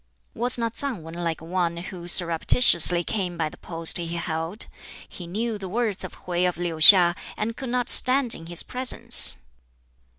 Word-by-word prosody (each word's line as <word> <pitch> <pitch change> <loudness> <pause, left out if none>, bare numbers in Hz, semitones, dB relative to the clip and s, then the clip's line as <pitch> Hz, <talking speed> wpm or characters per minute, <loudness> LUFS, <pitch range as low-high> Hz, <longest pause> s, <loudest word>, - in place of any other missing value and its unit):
"Was 245 +2 -3
not 230 -1 -4
Tsang 255 - -3
Wan 165 +1 -12
like 170 -2 -6
one 170 0 -4
who 175 0 -10
surreptitiously 175 +1 +4
came 180 -3 -5
by 160 -2 -3
the - - -17
post 165 0 +1
he 170 - -6
held? 170 +4 -5 0.4
He 175 - -12
knew 215 +4 -5
the 190 -2 -9
worth 220 -1 -4
of - - -12
Hwķi 180 0 -2
of 180 - -9
Liu 170 -2 -6
hiŠ, 175 +1 +6 0.2
and 225 +2 -5
could 265 0 -9
not 245 0 -3
stand 255 -2 +5
in 165 - -11
his 175 0 0
presence. 255 - +2
180 Hz, 175 wpm, -22 LUFS, 170-230 Hz, 0.4 s, hiŠ